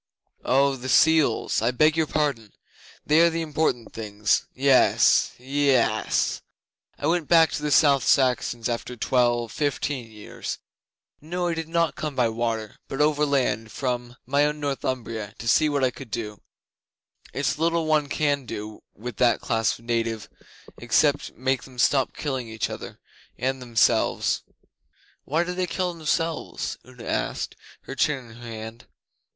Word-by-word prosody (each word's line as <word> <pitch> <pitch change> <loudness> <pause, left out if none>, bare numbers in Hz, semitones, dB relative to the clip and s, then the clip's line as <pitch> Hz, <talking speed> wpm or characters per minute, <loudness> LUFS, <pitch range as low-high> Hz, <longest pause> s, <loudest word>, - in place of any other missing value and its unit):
'Oh, 135 +1 +3
the 130 +1 -6
seals! 155 -8 +3
I 115 - +2
beg 155 +5 +3
your 160 -1 +1
pardon. 140 -10 -1 0.5
They 155 +2 +5
are 170 - +6
the 165 0 -2
important 150 -6 -1
things. 105 -1 0
Yes 135 0 +4
yess! 135 -1 +1 0.6
I - - -4
went 165 -1 +1
back 165 -2 +5
to - - -3
the 150 - -1
South 140 -2 +5
Saxons 125 -3 +2
after 120 +1 -4
twelve 120 -1 +1
fifteen 145 -4 -2
years. 105 -1 -7 0.6
No, 175 +3 -2
I - - 0
did 165 -1 -5
not 165 -1 +1
come 150 -2 -4
by 120 -3 +2
water, 115 -2 -3
but 135 - -5
overland 140 -7 +1
from 125 -2 -3
my 140 +3 +2
own 150 0 0
Northumbria, 120 -6 -3
to 115 - -7
see 150 +7 +4
what 140 -2 0
I 130 - +3
could 130 -1 -11
do. 105 -1 -5 0.9
It's 140 +2 -1
little 165 0 +1
one 155 -2 +2
can 145 -4 0
do 105 +1 -7
with 115 +1 -7
that 120 -2 +3
class 115 -1 0
of 115 - -19
native 115 -2 -1 0.5
except - - +1
make 130 +2 0
them 130 -2 -14
stop 135 +2 +2
killing 130 -5 -3
each 110 0 -3
other - - -8 0.4
and 130 +2 -2
themselves 115 -3 +2 0.4
' - - -36
'Why 160 +5 +1
did 180 +1 -5
they 185 -1 0
kill 180 0 -2
themselves?' 165 0 -2
Una 125 -2 -13
asked, - - -2 0.3
her - - -8
chin 135 -3 -1
in - - -13
her 120 0 -10
hand. 110 +1 -8
130 Hz, 155 wpm, -25 LUFS, 115-150 Hz, 0.9 s, are